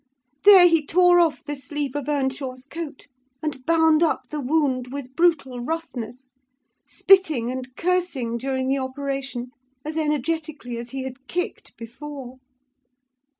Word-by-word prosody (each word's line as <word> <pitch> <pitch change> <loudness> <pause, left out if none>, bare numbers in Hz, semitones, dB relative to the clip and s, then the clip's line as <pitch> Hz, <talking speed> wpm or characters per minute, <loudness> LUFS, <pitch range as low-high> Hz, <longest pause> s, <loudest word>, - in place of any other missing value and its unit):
There 385 -3 +10
he 330 -3 +3
tore 355 +3 +5
off 330 -3 +2
the 290 0 -4
sleeve 280 0 -4
of 290 0 -3
Earnshaw's 265 -2 -2
coat, 305 -2 -7 0.4
and 285 -4 -3
bound 320 -1 +4
up 330 - +1
the 305 - -3
wound 260 -3 0
with 265 -2 -7
brutal 295 -7 +2
roughness; 255 -3 -5 0.5
spitting 315 -12 +3
and 255 0 -6
cursing 335 -10 -1
during 260 +1 -2
the 270 +1 +1
operation 270 -2 -4 0.3
as 310 +1 -4
energetically 305 -4 -2
as 235 +1 -6
he 270 0 -5
had 265 +1 -9
kicked 355 +1 -4
before. 260 +2 -9
280 Hz, 135 wpm, -23 LUFS, 255-320 Hz, 0.5 s, There